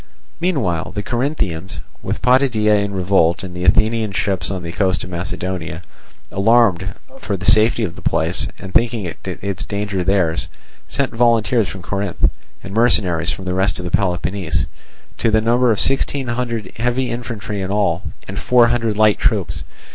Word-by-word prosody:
Meanwhile 120 - -1
the 105 - -2
Corinthians, 110 - -2 0.2
with - - -4
Potidæa 110 -5 +3
in 100 - -3
revolt 90 -3 +2
and 90 -2 -7
the 90 +1 -3
Athenian 110 +3 +3
ships 95 -4 0
on 95 -2 -4
the 85 - -5
coast 95 -2 0
of 90 - -8
Macedonia, 90 -1 -4 0.5
alarmed 105 -2 +3 0.2
for 100 - -3
the 95 - -7
safety 110 +1 +4
of 85 -6 -3
the - - -11
place 80 +3 0
and 95 -2 -9
thinking 115 -7 +1
its 95 -2 -4
danger 100 -1 -2
theirs, 90 -3 +1 0.4
sent 135 -3 -2
volunteers 115 -2 +3
from 95 -2 -8
Corinth, 100 -2 -1 0.3
and 100 - -8
mercenaries 95 -7 +2
from 95 - -4
the 90 - -1
rest 95 +1 0
of 90 -1 -5
Peloponnese, 90 -4 0 0.5
to - - +2
the 110 0 +4
number 120 +3 +3
of 105 - +1
sixteen 135 -1 +1
hundred 120 -2 -3
heavy 120 +2 0
infantry 115 -3 -4
in 95 - -3
all, 95 -4 +1 0.3
and 100 +1 -5
four 120 -2 +4
hundred 115 -3 0
light 110 -1 +4
troops. - - 0
100 Hz, 160 wpm, -19 LUFS, 90-115 Hz, 0.5 s, safety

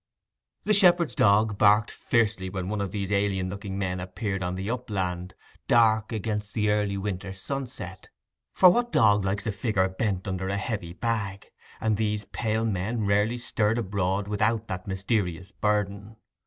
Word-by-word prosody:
The 215 - +2
shepherd's 175 - +5
dog 105 -1 +3
barked 105 +1 +5
fiercely 105 -6 0
when 95 -1 -4
one 105 -1 -2
of 100 - -2
these 100 -1 -4
alien 100 -2 0
looking 100 0 -5
men 95 -2 -2
appeared 95 +2 -4
on 90 0 -2
the 95 +1 -4
upland, 95 -7 -3 0.3
dark 110 -2 +4
against 105 -1 -3
the 105 -2 +2
early 105 -1 0
winter 95 -1 -4
sunset; 120 -5 -5 0.4
for 185 -1 +7
what 240 +5 0
dog 105 -2 +4
likes 100 +1 -1
a 110 - 0
figure 100 -2 0
bent 95 0 -2
under 95 0 -2
a 100 - -1
heavy 95 -5 -4
bag?—and 105 0 -3
these 105 -1 -1
pale 110 +2 -1
men 110 +2 -1
rarely 105 +4 +2
stirred 115 -2 0
abroad 100 -2 -1
without 105 +2 0
that 90 +1 -5
mysterious 95 -2 -2
burden. 105 0 -2
105 Hz, 155 wpm, -26 LUFS, 95-110 Hz, 0.4 s, for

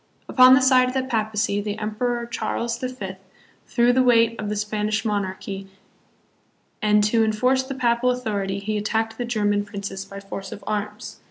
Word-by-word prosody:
Upon 255 0 +7
the 260 - +3
side 255 -1 +5
of 255 - -4
the 265 - +1
Papacy, 215 -4 -1
the 205 0 -4
Emperor 235 +3 -2
Charles 235 0 -3
the 255 - -3
Fifth 195 -7 -7 0.5
threw 240 +1 +3
the 260 - +4
weight 230 -2 +4
of 210 - -3
the 210 - -2
Spanish 210 +1 -1
monarchy, 195 -1 -3 1.1
and 210 -1 +4
to 225 +2 +3
enforce 250 +5 +2
the 265 +1 -6
Papal 245 -1 +2
authority 205 -6 -2
he 210 +2 -2
attacked 225 +2 -2
the 245 - -1
German 205 -3 0
princes 200 -1 -6
by 195 0 -9
force 195 0 -7
of 205 -2 -9
arms. 210 0 -4
215 Hz, 175 wpm, -23 LUFS, 205-245 Hz, 1.1 s, Upon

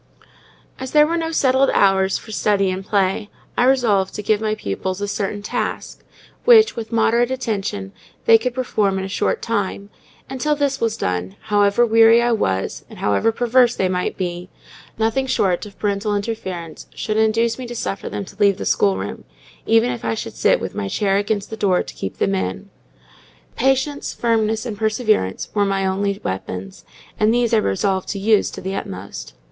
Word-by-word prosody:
As 260 -1 -6
there 300 0 +7
were 330 +2 -1
no 325 -1 -2
settled 270 -3 +3
hours 195 -1 +3
for 220 - -11
study 200 -2 +1
and 185 +1 -4
play, 200 +1 0 0.3
I 245 - +3
resolved 230 -8 +2
to 210 - -5
give 215 +1 +1
my 215 -1 0
pupils 185 - -4
a 205 - -2
certain 205 0 -3
task, - - -4 0.4
which, 445 -3 +6
with 230 0 -6
moderate 230 +1 +2
attention, 205 -6 -3 0.3
they 225 0 +7
could 250 +1 -3
perform 210 -6 0
in 190 - -3
a - - -4
short 195 - -1
time; 205 -2 -2 0.4
and 265 -1 -7
till 300 0 +2
this 285 -1 -1
was 225 -1 0
done, 90 +1 -2 0.2
however 205 +3 +4
weary 225 0 +6
I 240 0 +2
was, 95 - -1
or - - -11
however 105 - +1
perverse 245 +1 +3
they 190 - +1
might 180 0 -2
be, 180 -1 -4 0.5
nothing 225 +4 0
short 190 -5 0
of 200 - -15
parental 205 0 -1
interference 190 -6 -5
should 215 0 -2
induce 225 +2 +2
me 255 - -5
to 240 - -7
suffer 200 -3 -4
them 200 - -4
to 195 - -14
leave 200 -2 +4
the - - -5
schoolroom, 95 0 0 0.4
even 225 +2 +4
if 240 - -6
I 115 - -1
should - - -6
sit - - +3
with - - -5
my 100 - -3
chair 195 - +1
against 205 0 -2
the - - -3
door 195 -4 +2
to - - -10
keep 95 - -6
them 100 - +1
in. 95 -1 -3 0.8
Patience, 270 +3 0
Firmness, 220 -1 0
and 225 -4 -4
Perseverance 215 - 0
were 205 - +2
my 195 -1 0
only 200 +1 -1
weapons; 95 0 -5 0.3
and 215 +1 +4
these 240 0 +1
I - - +6
resolved 190 - 0
to - - -3
use 210 +1 +3
to - - -9
the 190 +1 -4
utmost. 95 - -7
210 Hz, 185 wpm, -20 LUFS, 190-235 Hz, 0.8 s, there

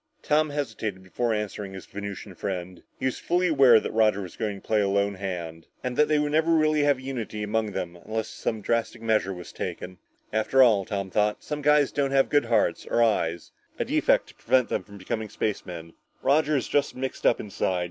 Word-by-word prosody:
Tom 155 +1 +2
hesitated 110 -9 -4
before 115 +6 -1
answering 105 -2 -3
his 95 - -8
Venusian 100 -1 -7
friend. 90 -1 -5 0.2
He - - -4
was 130 - -1
fully 180 +1 +1
aware 135 -7 +7
that - - -5
Roger 110 -2 +2
was 90 - -9
going 105 -3 -3
to - - -23
play 110 -1 +3
a 100 - +1
lone 100 +1 +1
hand. 85 -4 -6 0.2
And 125 -1 -2
that 150 - +4
they 155 - +2
would 150 0 0
never 160 +2 +2
really 155 -1 +3
have 145 -2 +3
unity 120 -5 -5
among 105 0 -1
them 85 -1 -4
until 110 +6 -3
some 110 0 -4
drastic 115 +2 -1
measure 110 -4 +1
was 90 -2 -8
taken. 90 0 -6 0.3
After 110 +5 +4
all, 105 -6 +4
Tom 100 -2 -4
thought, 105 +1 +1
some 150 0 -4
guys 150 -1 +4
don't 140 -1 0
have 135 0 +3
good 145 -3 +3
hearts, 115 -2 +1
or 120 - +3
eyes, 85 -7 0 0.3
a - - -1
defect - - +2
to - - -14
prevent 130 -2 +2
them - - -1
from 100 -1 -13
becoming 110 +3 -4
spacemen. 85 -7 -4 0.3
Roger 150 +1 +3
is 130 - -2
just 145 0 0
mixed 130 +1 -2
up - - +3
inside. 95 -3 -1
110 Hz, 210 wpm, -26 LUFS, 100-135 Hz, 0.3 s, aware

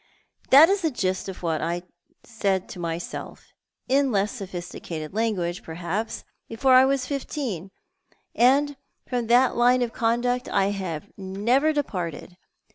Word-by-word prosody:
That 290 +4 +9
is 395 +2 +1
the 325 - +1
gist 190 -7 -2
of 185 - -9
what 160 -2 0
I 170 +2 -2 0.4
said 195 -5 -1
to 180 - -8
myself, 170 0 -6 0.3
in 275 0 +2
less 205 0 +1
sophisticated 175 -6 -7
language, 195 -6 -1
perhaps, 175 +7 -4 0.3
before 255 +4 +2
I 255 +1 +8
was 270 -1 +1
fifteen, 255 - -4 0.6
and 275 +4 +3 0.3
from 245 -3 -2
that 245 +3 +4
line 245 +1 +4
of 235 - -4
conduct 245 +2 0
I 195 -1 +2
have 180 -6 -4
never 220 +11 +1
departed. 180 - -4
220 Hz, 135 wpm, -25 LUFS, 180-255 Hz, 0.6 s, That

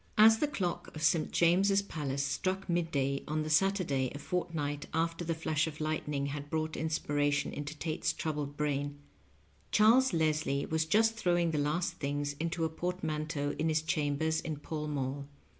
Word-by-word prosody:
207 220 +1 +9
As 220 - -3
the 300 -1 0
clock 175 -4 -3
of 155 - -5
St. 155 +1 +3
James's 195 +4 +4
Palace 140 -7 -3
struck 190 +6 -1
midday 145 -6 0
on 155 +1 -1
the 155 - -3
Saturday 155 -7 +2
a - - -3
fortnight 150 -3 -3
after 165 +1 0
the 165 -1 -1
flash 160 -1 0
of 155 -1 -7
lightning 150 -2 -1
had 145 +1 -5
brought 155 0 -1
inspiration 145 -2 0
into 145 +1 -5
Tate's 155 0 -1
troubled 145 -2 -3
brain, 145 -1 -1 0.7
Charles 240 +5 +5
Leslie 155 -3 +1
was 160 0 0
just 225 +6 +3
throwing 175 -5 +1
the 150 - 0
last 150 +5 -1
things 145 0 -2
into 165 0 -1
a - - 0
portman 160 -2 -3
teau 145 -2 -2
in 160 +1 +1
his 155 0 +1
chambers 160 +1 0
in 160 -2 -3
Fall 150 +1 -5
Mall. 140 -1 -3
155 Hz, 175 wpm, -32 LUFS, 145-170 Hz, 0.7 s, 207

